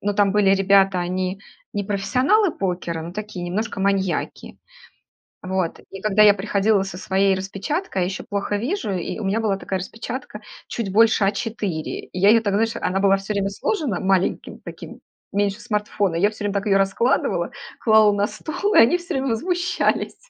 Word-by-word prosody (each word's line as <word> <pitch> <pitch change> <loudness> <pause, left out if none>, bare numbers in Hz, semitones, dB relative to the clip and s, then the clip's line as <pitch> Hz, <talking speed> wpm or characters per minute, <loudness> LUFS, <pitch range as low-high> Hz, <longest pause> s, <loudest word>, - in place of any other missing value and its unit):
Ну, 205 0 -1
там 200 -1 +3
были 205 -2 +3
ребята, 195 -1 +3
они 185 +2 -2 0.3
не 205 - -1
профессионалы 255 - +2
покера, 175 -3 -3
но 170 +2 -7
такие 210 -3 -6
немножко 210 +5 -3
маньяки. 195 -2 -1 0.9
Вот, 185 -2 -1
и 195 - -8
когда 215 +1 +3
я 210 -1 +8
приходила 200 0 +1
со 195 -2 -7
своей 195 +1 +1
распечаткой, 195 - -3
а - - +2
еще 190 - -4
плохо 205 0 -2
вижу, 245 - -2
и 180 +3 -3
у 215 - -5
меня 200 +4 0
была 205 -3 0
такая 190 -1 -3
распечатка 225 +3 -7 0.3
чуть 225 -5 -3
больше 220 0 +4
А4. 200 -5 -3
И 185 - -8
я 200 +3 +6
ее, 230 - +6
так, 205 -3 -1
знаешь, 225 +2 +1
она 190 +1 0
была 195 0 +4
всё 195 +2 -4
время 200 -1 0
сложена 270 - -2
маленьким 190 -1 0
таким, - - -10 0.3
меньше 205 +2 0
смартфона, 210 -5 -1
я 205 +5 +3
всё 215 -1 -8
время 205 0 -1
так 200 - -1
её 195 -2 +3
раскладывала, 195 +6 +1 0.3
клала 220 -2 +5
на 205 0 +1
стол, 335 - -3
и - - +6
они 235 +10 +6
все 345 -1 -6
время 270 0 -1
возмущались. 350 +9 0
200 Hz, 180 wpm, -22 LUFS, 195-220 Hz, 0.9 s, я